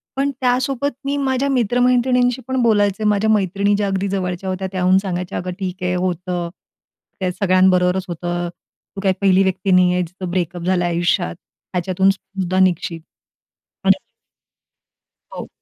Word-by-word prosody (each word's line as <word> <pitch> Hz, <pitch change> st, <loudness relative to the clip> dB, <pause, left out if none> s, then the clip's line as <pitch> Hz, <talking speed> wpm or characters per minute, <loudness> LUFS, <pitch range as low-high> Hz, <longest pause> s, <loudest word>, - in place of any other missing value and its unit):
पण 275 Hz, +1 st, 0 dB
त्यासोबत 260 Hz, +2 st, +1 dB
मी 280 Hz, +1 st, 0 dB
माझ्या 270 Hz, 0 st, 0 dB
मित्र-मैत्रिणींशी 250 Hz, 0 st, +2 dB
पण 260 Hz, -1 st, 0 dB
बोलायचे. 205 Hz, -2 st, +2 dB
माझ्या 210 Hz, 0 st, +2 dB
मैत्रिणी 200 Hz, -1 st, +2 dB
ज्या 205 Hz, 0 st, 0 dB
अगदी 195 Hz, 0 st, -1 dB
जवळच्या 190 Hz, -1 st, -3 dB
होत्या, 185 Hz, 0 st, -3 dB
त्याहून 185 Hz, 0 st, +3 dB
सांगायच्या, 180 Hz, -2 st, -3 dB
अग, 180 Hz, -, -5 dB
ठीक 185 Hz, -1 st, -4 dB
आहे, 180 Hz, 0 st, 0 dB
होतं, 180 Hz, -1 st, -2 dB, 0.7 s
त्या 185 Hz, -1 st, -1 dB
सगळ्यांबरोबरच 185 Hz, 0 st, +2 dB
होतं. 175 Hz, 0 st, -3 dB, 0.5 s
तू 195 Hz, -, -5 dB
काही 190 Hz, -1 st, +2 dB
पहिली 195 Hz, -1 st, +4 dB
व्यक्ती 190 Hz, 0 st, 0 dB
नाही 180 Hz, -1 st, +5 dB
आहेस, 180 Hz, 0 st, 0 dB
जिचं 180 Hz, +1 st, -7 dB
ब्रेकअप 175 Hz, -1 st, -2 dB
झालं 180 Hz, 0 st, +1 dB
आयुष्यात. 175 Hz, +1 st, 0 dB, 0.4 s
ह्याच्यातून 185 Hz, +2 st, +1 dB
सुद्धा 190 Hz, -1 st, -2 dB
निघशील. 175 Hz, -2 st, +1 dB, 0.9 s
आणि -, -, +5 dB, 1.4 s
हो. -, -, -7 dB
190 Hz, 140 wpm, -20 LUFS, 180-210 Hz, 1.4 s, नाही